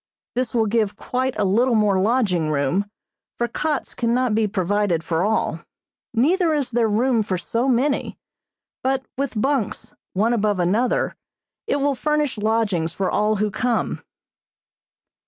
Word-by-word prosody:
This 250 -1 -2
will 225 -2 +3
give 215 -1 0
quite 255 +3 -2
a 210 - +1
little 235 +6 +3
more 205 -3 +3
lodging 195 -8 +1
room, 150 +7 +1 0.5
for 240 - 0
cots 300 +6 -2
cannot 240 0 +1
be 220 0 +2
provided 195 -3 0
for 165 0 -1
all, 200 -5 0 0.5
neither 320 - +2
is 285 -4 -1
there 235 -1 +2
room 230 +2 +2
for 195 -3 -1
so 230 - -1
many, 270 +3 +1 0.6
but 265 0 0
with 270 -4 -2
bunks, 270 -3 -1 0.2
one 220 +5 +2
above 210 -4 +1
another, 210 +8 +1 0.5
it - - +1
will 285 0 +1
furnish 295 -2 0
lodgings 210 -7 0
for 195 - -1
all 210 +1 +2
who 210 0 0
come. 240 +2 -1
225 Hz, 145 wpm, -22 LUFS, 200-255 Hz, 0.6 s, will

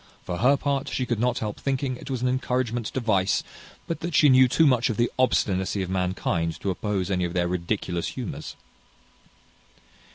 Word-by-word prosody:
For 90 - -4
her 135 +5 +4
part, 140 -1 -1
she 130 - -1
could 120 -3 -1
not 125 +1 +1
help 105 -3 -4
thinking 135 -1 -1
it 130 - -10
was 130 -2 -2
an - - +2
encouragement 125 -2 -1
to - - -3
vice; 100 -6 +1 0.4
but 165 - -3
that 170 -1 -4
she 150 - +6
knew 130 0 +7
too 160 +6 +3
much 125 -4 +3
of 110 - -2
the 120 - +1
obstinacy 95 -6 +1
of 95 - -5
mankind 90 -3 -1
to 100 - 0
oppose 100 0 -2
any 90 -1 +1
of 85 -1 -2
their 90 -1 +1
ridiculous 90 -1 -2
humours." 125 -6 -6
115 Hz, 190 wpm, -25 LUFS, 95-130 Hz, 0.4 s, knew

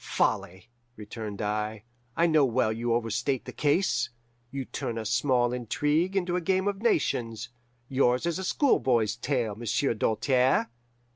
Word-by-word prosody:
"'Folly!' 95 +7 -1 0.2
returned 105 0 -6
I. 105 0 -2 0.3
'I 170 - +4
know 155 -3 +4
well 120 -3 +1
you 120 +1 -2
overstate 120 +3 -1
the - - -8
case. 145 -5 +1 0.4
You 135 0 -5
turn 115 -1 -4
a 110 - -4
small 120 +1 +2
intrigue 150 - 0
into 180 -2 0
a 180 - 0
game 190 +2 +1
of 200 0 -2
nations. 120 - 0 0.4
Yours 130 +1 +2
is 170 +1 -1
a - - -4
schoolboy's 125 - +2
tale, 120 -3 -1
Monsieur 115 +4 0
Doltaire. 125 +4 +1
125 Hz, 145 wpm, -27 LUFS, 115-150 Hz, 0.4 s, I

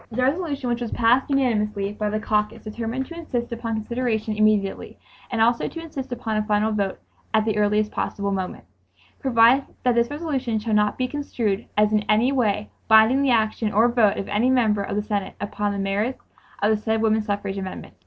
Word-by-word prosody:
The 250 +3 -1
resolution 285 -1 -1
which 240 0 -1
was 235 - -2
passed 240 +4 +3
unanimously 210 -7 0
by 210 0 -2
the 215 +1 -1
caucus 210 -1 -1
determined 230 +4 -4
to 335 - -10
"insist 250 -9 -4
upon 230 -1 -3
consideration 220 -1 -2
immediately" 210 -2 +1 0.3
and 235 - -2
'also 235 +2 +3
to 330 - -7
insist 280 -5 -7
upon 230 -3 -2
a - - +2
final 210 +1 +1
vote... 200 -3 -1 0.4
at 215 0 +3
the 220 -2 0
earliest 210 0 +1
possible 200 0 -2
moment…. 190 -2 -4 0.6
Provided, 250 +1 +4 0.2
That 250 - +3
this 235 0 +2
resolution 285 -7 -2
shall 215 +1 -2
not 210 0 +2
be 255 - 0
construed 235 -7 -2
as 210 0 +3
in 215 - +3
any 225 +5 +3
way 210 -6 0 0.2
binding 220 +5 +6
the 280 - +2
action 220 -2 +1
or 220 +4 +4
vote 230 -4 +3
of 195 - -4
any 220 +5 +1
Member 225 -5 +2
of 200 - -3
the 210 - 0
Senate 205 -2 -3
upon 205 0 -2
the 200 - -3
merits 200 +6 -2 0.4
of 210 - +4
the 215 - +2
said 220 +1 -1
woman 220 0 +3
suffrage 200 -2 -3
amendment." 190 -1 -7
220 Hz, 200 wpm, -23 LUFS, 210-245 Hz, 0.6 s, binding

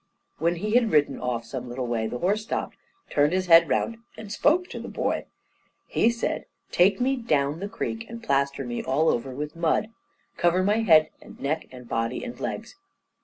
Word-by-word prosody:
When 170 +3 +2
he 210 +5 -3
had 235 -2 +4
ridden 145 -2 +3
off 120 -2 -2
some 125 +1 -6
little 125 +1 -3
way 115 -2 -1
the 125 - -4
horse 200 - +1
stopped 215 - -3 0.3
and - - -14
turned 145 +3 +3
his 185 0 +1
head 165 -1 +7
round, 230 - 0 0.2
and 210 -2 -8
spoke 315 +11 +2
to - - -6
the - - -7
boy. - - -2 0.6
He 230 - +2
said, 235 0 -2 0.3
"Take 190 +3 +4
me 265 +2 +2
down 150 - 0
the 200 +2 -4
creek, 225 +1 -4
and 230 0 -8
plaster 140 - 0
me 120 -1 -3
all 150 +5 +2
over 120 +3 0
with 150 +2 -5
mud. 170 +6 +1 0.5
Cover 175 +2 +3
my 205 +3 +2
head 165 -9 +5
and - - -14
neck 155 +3 -2
and 125 -1 -11
body 115 - -2
and 245 -1 -7
legs." - - -5
165 Hz, 200 wpm, -26 LUFS, 135-215 Hz, 0.6 s, head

